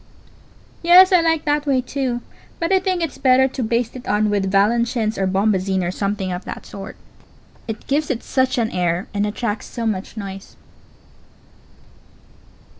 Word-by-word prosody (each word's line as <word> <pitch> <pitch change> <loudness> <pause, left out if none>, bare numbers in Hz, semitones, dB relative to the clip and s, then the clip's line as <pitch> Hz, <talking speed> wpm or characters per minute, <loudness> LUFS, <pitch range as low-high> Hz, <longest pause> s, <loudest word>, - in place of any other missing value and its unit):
Yes, 360 +2 +7
I 360 -2 +6
like 325 -2 +1
that 295 0 0
way, 270 -2 +3
too; 250 -1 -2 0.4
but 335 +2 -1
I 380 - +5
think 370 -2 -1
it's 325 - -4
better 265 -1 +4
to 260 - -5
baste 235 +1 -1
it 255 - -9
on 210 0 +1
with 195 -2 0
Valenciennes 220 +2 +1
or 190 - 0
bombazine, 190 -1 +1
or 175 - -1
something 195 -1 -2
of 180 +1 -4
that - - -7
sort. 195 0 -9 0.7
It 220 -1 -6
gives 295 +2 0
it 250 -4 -2
such 260 -1 0
an 230 -2 0
air 175 +1 -1
and 205 0 0
attracts 210 0 -3
so 235 -2 -5
much 215 0 -3
noise. 195 -1 -8
Pause. - - -31
230 Hz, 170 wpm, -20 LUFS, 200-270 Hz, 0.7 s, Yes